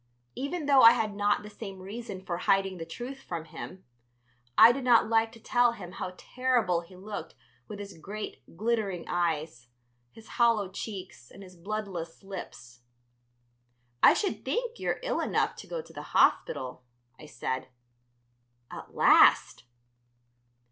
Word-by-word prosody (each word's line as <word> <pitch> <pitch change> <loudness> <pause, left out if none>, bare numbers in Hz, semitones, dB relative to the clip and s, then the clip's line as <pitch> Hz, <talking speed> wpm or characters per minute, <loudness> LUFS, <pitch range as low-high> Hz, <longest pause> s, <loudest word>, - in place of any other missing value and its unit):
Even 290 +4 -4
though 280 -2 +6
I 230 +1 +10
had 220 -3 -1
not 205 0 +1
the 210 - -9
same 200 -2 -8
reason 195 0 -8
for 170 -2 -2
hiding 195 -1 +1
the 165 - -6
truth 250 +10 -7
from 170 -8 -6
him, 185 +3 -9 0.7
I 230 - +10
did 270 +2 -4
not 240 -3 +5
like 225 0 +2
to 230 - -14
tell 245 +1 +2
him 185 -6 -9
how 185 0 -6
terrible 240 -9 0
he 175 +2 -16
looked 190 -3 -7 0.3
with 210 - -7
his 200 -4 -9
great 205 +6 -7 0.2
glittering 210 -5 -1
eyes, 155 -7 -2 0.4
his 220 - -15
hollow 220 -5 +3
cheeks, 185 - -7
and 200 - -13
his 185 -1 -14
bloodless 185 -3 -5
lips. 125 -11 -9 1.2
"I - - +8
should 410 - -2
think 480 0 -2
you're - - -1
ill - - -1
enough - - 0
to - - -10
go - - -4
to - - -16
the - - -7 0.2
hospital," 125 -1 +2 0.4
I 155 - -11
said. 130 -3 -4 1.0
"At - - -10
last!" - - +5
200 Hz, 150 wpm, -29 LUFS, 175-230 Hz, 1.2 s, I